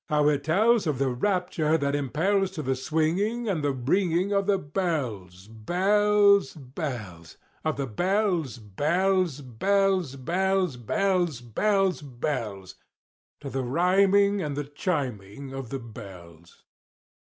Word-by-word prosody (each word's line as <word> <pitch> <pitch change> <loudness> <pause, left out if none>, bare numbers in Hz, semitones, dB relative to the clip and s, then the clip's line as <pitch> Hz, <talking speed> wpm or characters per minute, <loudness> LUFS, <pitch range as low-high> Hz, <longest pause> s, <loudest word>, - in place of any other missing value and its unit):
—how 150 -1 +3
it 145 -1 0
tells 205 +6 +3
Of 150 -4 0
the 135 0 +1
rapture 165 +1 0
that 140 -2 -1
impels 165 - +1
To 155 - -3
the 130 0 0
swinging 165 - -1
and 175 -7 -1
the 145 - +2
ringing 175 +8 0
Of 200 0 +1
the 200 -1 +3
bells, 130 - -3
bells, 200 - +3
bells— 125 - -7 0.3
Of 155 -2 -1
the 140 - -1
bells, 175 - 0
bells, 160 - 0
bells, 185 - +1
bells, 180 +3 0
Bells, 175 - 0
bells, 190 - +1
bells— 120 - -4 0.7
To 140 - -6
the 135 - -2
rhyming 195 +8 +3
and 145 -4 -3
the 145 - -1
chiming 135 - -4
of 135 -3 -6
the 135 - -3
bells! 90 - -12
155 Hz, 130 wpm, -26 LUFS, 125-190 Hz, 0.7 s, how